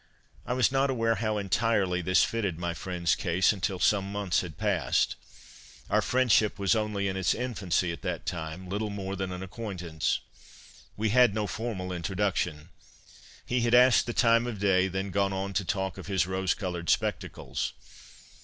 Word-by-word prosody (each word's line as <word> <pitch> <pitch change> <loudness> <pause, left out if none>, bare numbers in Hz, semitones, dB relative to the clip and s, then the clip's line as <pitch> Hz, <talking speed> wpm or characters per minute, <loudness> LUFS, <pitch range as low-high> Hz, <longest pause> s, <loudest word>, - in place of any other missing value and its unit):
' - - -30
I - - 0
was 125 -2 +3
not 135 +1 +2
aware 115 -3 +1
how 110 -2 -1
entirely 100 -2 +1
this 95 +2 +3
fitted 100 -8 -1
my 85 0 -2
friend's 85 -1 -1
case 90 +1 +2
until 95 -1 -2
some 100 +1 +2
months 100 -3 0
had 80 -5 -8
passed. 100 -6 +1 0.8
Our - - +4
friendship 125 -4 +2
was 100 +3 +2
only 105 -2 -1
in 95 - -2
its 95 -2 +1
infancy 100 -8 -1
at 85 - -7
that - - -4
time, 80 +2 -5
little 105 +3 -2
more 100 -1 -4
than 95 -1 -3
an 90 +1 -5
acquaintance. 90 -6 -3 0.8
We 110 +1 0
had 120 -2 +5
no 105 -1 0
formal 105 -5 -4
introduction. 90 -3 -2 0.8
He 125 0 0
had 120 +1 +3
asked 125 0 +6
the 120 - -2
time 115 0 +3
of 120 -3 -4
day, 95 -2 +3
then 95 +1 -3
gone 100 0 +1
on 95 +1 -3
to 100 - 0
talk 95 0 -2
of - - -9
his 95 -3 +1
rose 95 0 0
coloured 90 -4 -4
spectacles. - - -1
100 Hz, 175 wpm, -28 LUFS, 90-110 Hz, 0.8 s, asked